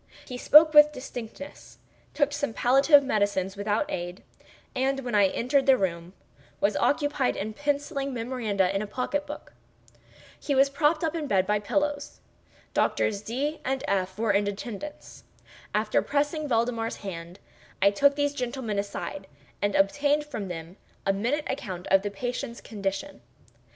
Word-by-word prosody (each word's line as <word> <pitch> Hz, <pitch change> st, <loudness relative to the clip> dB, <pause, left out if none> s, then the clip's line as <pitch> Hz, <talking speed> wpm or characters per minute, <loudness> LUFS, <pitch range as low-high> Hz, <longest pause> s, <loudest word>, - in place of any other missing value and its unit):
He 250 Hz, -, -7 dB
spoke 305 Hz, +5 st, +7 dB
with 300 Hz, 0 st, +8 dB
distinctness—took 280 Hz, +3 st, -6 dB
some 285 Hz, -4 st, -2 dB
palliative 275 Hz, +5 st, +5 dB
medicines 205 Hz, -6 st, 0 dB
without 205 Hz, +5 st, 0 dB
aid—and, 255 Hz, +9 st, -5 dB
when 245 Hz, -3 st, -5 dB
I 205 Hz, -2 st, +5 dB
entered 265 Hz, +8 st, +1 dB
the 265 Hz, -1 st, +7 dB
room, 170 Hz, -2 st, -3 dB, 0.5 s
was 200 Hz, 0 st, +2 dB
occupied 290 Hz, -3 st, +1 dB
in 215 Hz, +2 st, -4 dB
penciling 285 Hz, 0 st, -2 dB
memoranda 225 Hz, -6 st, -1 dB
in 195 Hz, -, +1 dB
a 215 Hz, -, -4 dB
pocket 275 Hz, +6 st, -2 dB
book. 295 Hz, -, -9 dB, 0.9 s
He 285 Hz, -, -1 dB
was 275 Hz, +1 st, +4 dB
propped 305 Hz, +3 st, +2 dB
up 320 Hz, -1 st, 0 dB
in 330 Hz, -, -3 dB
the -, -, -5 dB
bed 190 Hz, -6 st, +2 dB
by 210 Hz, +2 st, +1 dB
pillows. 290 Hz, +6 st, -2 dB, 0.5 s
Doctors 200 Hz, -2 st, +1 dB
D—— 275 Hz, +8 st, -3 dB
and 265 Hz, 0 st, -2 dB
F—— 190 Hz, -1 st, -1 dB
were 220 Hz, -1 st, +1 dB
in 200 Hz, 0 st, +2 dB
attendance. 215 Hz, +8 st, -7 dB, 0.5 s
After -, -, +2 dB
pressing 295 Hz, +1 st, -1 dB
Valdemar's 230 Hz, -2 st, 0 dB
hand, 170 Hz, -1 st, -7 dB, 0.4 s
I 200 Hz, -, +5 dB
took 280 Hz, +7 st, +3 dB
these 290 Hz, 0 st, 0 dB
gentlemen 240 Hz, -5 st, -3 dB
aside, 200 Hz, -1 st, -5 dB, 0.3 s
and 205 Hz, -1 st, 0 dB
obtained 290 Hz, +9 st, +2 dB
from 225 Hz, -9 st, -5 dB
them 170 Hz, +1 st, -7 dB, 0.3 s
a 195 Hz, -, +3 dB
minute 245 Hz, +10 st, -1 dB
account 185 Hz, -9 st, -5 dB
of 195 Hz, 0 st, +6 dB
the 205 Hz, -, -3 dB
patient's 245 Hz, +4 st, -4 dB
condition. 195 Hz, -, -5 dB
240 Hz, 150 wpm, -27 LUFS, 200-285 Hz, 0.9 s, with